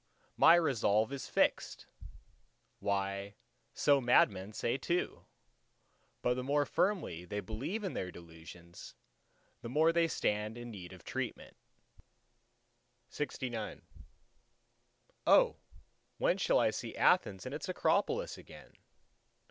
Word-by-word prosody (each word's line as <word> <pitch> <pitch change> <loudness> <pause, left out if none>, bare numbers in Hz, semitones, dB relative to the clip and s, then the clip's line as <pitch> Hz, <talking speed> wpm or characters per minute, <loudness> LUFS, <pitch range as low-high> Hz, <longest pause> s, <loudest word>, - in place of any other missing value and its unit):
—"My 165 - +7
resolve 125 -7 +2
is 140 - -5
fixed!"—Why 100 0 -3 0.4
so 140 -2 +4
madman 100 -5 +3
say 115 +3 -1
too; 175 +7 -2 1.0
but 125 - +3
the 125 - -3
more 145 +2 +1
firmly 175 - -1
they 105 +3 -4
believe 125 - -4
in 190 - -3
their 90 - -3
delusions, 85 0 -12 0.7
the 115 - -6
more 160 +5 +3
they 170 0 +3
stand 105 -5 -1
in 120 0 -8
need 90 -5 -9
of 95 -3 -13
treatment. - - -5 1.6
LXX 125 -6 -4 1.5
—"O! - - +5 0.6
when - - +1
shall - - +3
I - - +3
see - - -6
Athens 95 -2 +2
and 130 - -5
its 150 +6 -5
Acropolis 205 - 0
again?" - - -14
120 Hz, 110 wpm, -33 LUFS, 100-155 Hz, 1.6 s, My